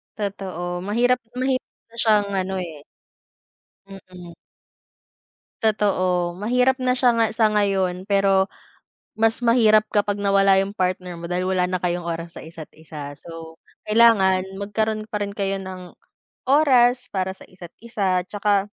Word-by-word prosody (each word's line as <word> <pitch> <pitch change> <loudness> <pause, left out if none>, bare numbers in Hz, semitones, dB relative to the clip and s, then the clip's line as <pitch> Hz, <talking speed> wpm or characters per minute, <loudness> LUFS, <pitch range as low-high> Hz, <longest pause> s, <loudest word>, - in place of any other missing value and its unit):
Totoo. 185 -4 -4
Mahirap 245 +4 +2 0.2
mahirap 260 0 -1 0.2
na 235 - -19
siyang 210 -3 +3
ano 190 0 -2
eh. 160 -4 -8 1.1
Mm. 185 -3 -12 1.3
Totoo. 185 -5 +1
Mahirap 250 +6 +2
na 255 -1 +1
siya 250 -1 +3
nga 230 - +4
sa 220 -1 +3
ngayon 190 -3 0
pero 195 -1 +3 0.7
mas 225 0 +2
mahirap 220 -3 +4
kapag 205 -1 0
nawala 195 -1 +4
yung 195 +2 -3
partner 180 -1 -2
mo 170 0 -8
dahil 180 +1 -1
wala 185 -1 +1
na 180 0 -2
kayong 175 -1 -1
oras 170 0 -5
sa - - -8
isa't 160 -1 -10
isa 150 -3 -9
so 165 0 -11 0.3
kailangan 210 -5 +5 0.2
magkaroon 215 +1 -2
pa 210 -1 -2
rin 200 - -7
kayo 195 -1 -2
ng 185 -2 -9 0.6
oras 250 -4 +4
para 190 -1 -1
sa - - -15
isa't 180 -2 -13
isa. 190 -6 0
Tsaka 205 -1 +1
195 Hz, 140 wpm, -22 LUFS, 180-215 Hz, 1.3 s, kailangan